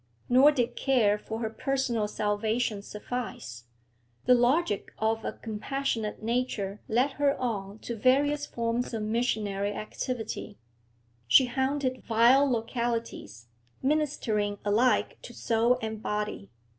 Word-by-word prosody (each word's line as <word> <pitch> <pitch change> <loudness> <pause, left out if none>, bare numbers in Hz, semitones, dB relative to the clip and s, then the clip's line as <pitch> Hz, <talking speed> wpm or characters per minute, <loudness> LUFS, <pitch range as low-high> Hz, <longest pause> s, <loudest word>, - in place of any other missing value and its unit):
Nor 260 +4 +7
did 245 -4 -1
care 220 -6 +2
for 220 +2 -6
her 220 - -1
personal 240 -3 -1
salvation 215 +1 -1
suffice; 205 - -6 0.6
the 250 - +6
logic 245 - +2
of 220 0 0
a - - -3
compassionate 225 0 -3
nature 225 -4 -2
led 250 +5 +2
her 280 -1 +3
on 205 -5 -3
to 235 - -3
various 285 +5 +2
forms 235 +1 -2
of 220 - -3
missionary 210 -3 -1
activity; 220 - -5 0.7
she 255 - +7
haunted 265 +1 -1
vile 240 +5 +5
localities, 230 - -3 0.3
ministering 260 -8 0
alike 225 +5 +2
to - - -11
soul 235 +2 +2
and 220 -1 -4
body. 210 - -3
230 Hz, 120 wpm, -28 LUFS, 210-255 Hz, 0.7 s, Nor